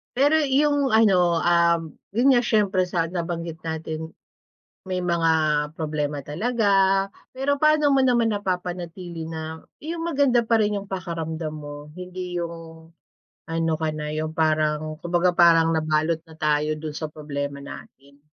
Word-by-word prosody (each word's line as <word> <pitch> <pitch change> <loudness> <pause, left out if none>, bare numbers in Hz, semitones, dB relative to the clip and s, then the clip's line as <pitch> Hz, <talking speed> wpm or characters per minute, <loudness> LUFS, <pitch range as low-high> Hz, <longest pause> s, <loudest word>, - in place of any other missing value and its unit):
Pero 285 +5 +4
'yung 285 -3 +2
ano, 180 -6 +4
um, 170 -2 +3 0.2
'yun 255 +4 +5
nga, 250 - +5
siyempre 205 -6 +1
sa 175 -2 0
nabanggit 170 -1 -4
natin 160 0 -5 0.7
may 185 -1 -2
mga 170 -2 +2 0.5
problema 150 -3 -3
talaga. 220 - -1 0.7
Pero 280 +2 0
paano 305 -1 +4
mo 270 - +4
naman 240 -3 +3
napapanatili 180 -3 -4
na 160 0 -6 0.2
'yung 330 +2 -4
maganda 275 -6 +3
pa 230 - +4
rin 210 -2 +1
'yung 200 - -12
pakiramdam 165 -4 -4
mo, 145 0 -9
hindi 180 0 -5
'yung 165 -1 -8 0.6
ano 165 0 -1
ka 155 -1 -2
na, 150 -1 -4
'yung 155 +1 -3
parang 155 -1 0
kumbaga 175 +1 +1
parang 165 -1 +6
nabalot 160 +1 0
na 160 - -15
tayo 150 -1 +1
do'n 155 0 -6
sa 155 -1 -5
problema 140 -2 -5
natin? 140 0 -13
170 Hz, 140 wpm, -24 LUFS, 155-200 Hz, 0.7 s, parang